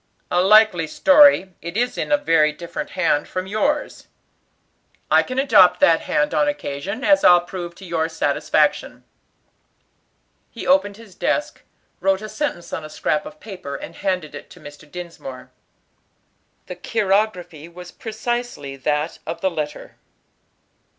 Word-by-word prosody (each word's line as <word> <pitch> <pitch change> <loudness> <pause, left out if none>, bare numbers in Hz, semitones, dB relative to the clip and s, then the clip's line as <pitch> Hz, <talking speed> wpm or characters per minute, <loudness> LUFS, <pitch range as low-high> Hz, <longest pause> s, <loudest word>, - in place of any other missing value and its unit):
"A 175 - +3
likely 200 -4 +5
story; 280 - +5
it 170 +4 -6
is 245 +1 0
in - - -4
a 295 - +5
very 165 - +3
different 170 +3 -7
hand 165 -5 +1
from 185 0 -4
yours." 280 +10 -2 1.0
"I - - +6
can 255 - -6
adopt 185 -10 +5
that 165 -1 +4
hand 300 0 0
on 295 - +2
occasion, 200 - -4
as 295 +1 +4
I'll 175 -1 +7
prove 175 -1 -7
to 190 - -12
your 165 -2 -1
satisfaction." 160 0 0 1.5
He - - -9
opened 270 -8 +2
his 225 -4 -15
desk, 295 - -2 0.4
wrote 195 +1 +1
a 215 - -6
sentence 290 - -4
on 160 - -4
a 155 - -9
scrap 150 0 -2
of 155 0 -13
paper, 185 -9 -8
and - - -8
handed 185 -6 -3
it 145 - -10
to - - -15
Mr. 145 0 -13
Dinsmore. 165 -7 -9 1.1
The 180 -1 -8
chirography 190 -6 -1
was 180 +1 -11
precisely 225 - -5
that 150 +4 -2
of 165 - -5
the 190 - +1
letter. 150 -3 -6
180 Hz, 145 wpm, -21 LUFS, 160-220 Hz, 1.5 s, I'll